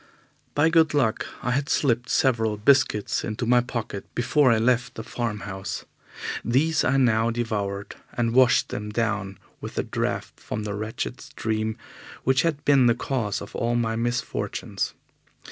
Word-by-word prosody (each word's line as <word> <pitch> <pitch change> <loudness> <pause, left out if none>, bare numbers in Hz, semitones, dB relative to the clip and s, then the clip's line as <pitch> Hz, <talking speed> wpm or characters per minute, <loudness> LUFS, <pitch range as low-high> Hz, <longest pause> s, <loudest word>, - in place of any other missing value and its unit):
By 150 +3 +4
good 160 -2 +4
luck 120 -6 +1 0.2
I 125 - 0
had 140 +3 0
slipped 120 -2 +1
several 115 -5 +2
biscuits 120 -2 +2
into 110 +1 -3
my 120 +1 +5
pocket 115 -5 -4
before 130 +2 +3
I 115 - +4
left 120 +1 +1
the 110 - -5
farm 115 -3 -3
house. 95 -1 -5 0.6
These 150 +6 +2
I 130 +2 +2
now 115 -3 +3
devoured, 105 -4 -3 0.2
and 115 -1 0
washed 130 -1 +5
them 105 0 -4
down 105 -3 -1 0.2
with - - -8
a - - +1
draught - - -3
from 110 - -4
that 105 -1 -3
wretched 110 +4 -4
stream 110 0 -2 0.5
which 130 0 +3
had 155 -3 -1
been 135 -3 +5
the 120 - +4
cause 115 -6 -2
of 100 - -11
all 120 0 0
my 115 -1 0
misfortunes. 120 +2 -2
120 Hz, 160 wpm, -25 LUFS, 110-130 Hz, 0.6 s, my